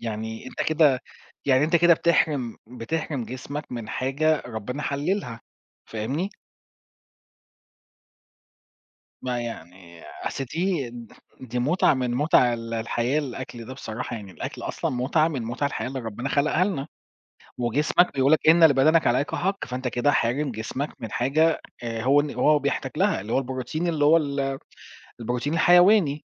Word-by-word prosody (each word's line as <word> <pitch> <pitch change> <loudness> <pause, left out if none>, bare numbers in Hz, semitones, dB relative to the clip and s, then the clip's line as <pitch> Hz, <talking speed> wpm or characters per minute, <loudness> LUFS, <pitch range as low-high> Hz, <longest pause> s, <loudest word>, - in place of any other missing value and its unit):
يعني 110 0 -5
أنت - - -4
كده 150 -5 +3 0.4
يعني 135 +1 +4
أنت 165 +2 +3
كده 170 0 +6
بتحرِم 150 -8 +1
بتحرِم 125 +2 -4
جسمك 135 +4 -7
من 115 -3 -5
حاجة 145 +4 0
ربنا 125 +5 -5
حللها، 140 - -2 0.5
فاهمني؟ 135 - -3 2.9
ما 125 -1 -2
يعني 90 -6 -9 0.2
أصل 135 - -3
دي 165 -3 -2 0.5
دي 125 -1 -4
مُتعة 145 +6 +3
من 125 -2 -1
مُتع 125 -3 +4
ال 115 0 -6
الحياة 120 +5 0
الأكل 130 -4 -6
ده 130 +3 -8
بصراحة 120 -1 -5
يعني 100 -3 -9
الأكل 80 - -7
أصلًا - - -3
مُتعة 140 +6 +1
من 135 -7 -3
مُتع 120 +5 -2
الحياة 135 - -3
اللي 135 0 -5
ربنا 115 +3 -5
خلقها 150 +5 +2
لنا، 160 -9 -2 0.7
وجسمك 145 +9 +2
بيقول 135 +1 +2
لك 155 0 +4
إن 165 +1 +6
لبدنك 155 +2 +5
عليك 125 +4 +1
حق، 195 +2 -1
فأنت 125 0 -4
كده 125 +4 +1
حارم 135 +2 0
جسمك 120 +6 -4
من 115 - -6
حاجة 155 +6 +2 0.2
آآ، 115 -1 -3
هو 140 +3 +5
إن 150 - -4
هو 150 -1 +4
بيحتاج 140 0 -2
لها - - +2
اللي 110 +3 -5
هو - - +3
البروتين 130 +5 -3
اللي 150 -3 +1
هو 160 +3 +6
ال 140 -3 -2 0.6
البروتين 125 +6 -2
الحيواني. 175 -3 +5
135 Hz, 150 wpm, -25 LUFS, 120-155 Hz, 2.9 s, كده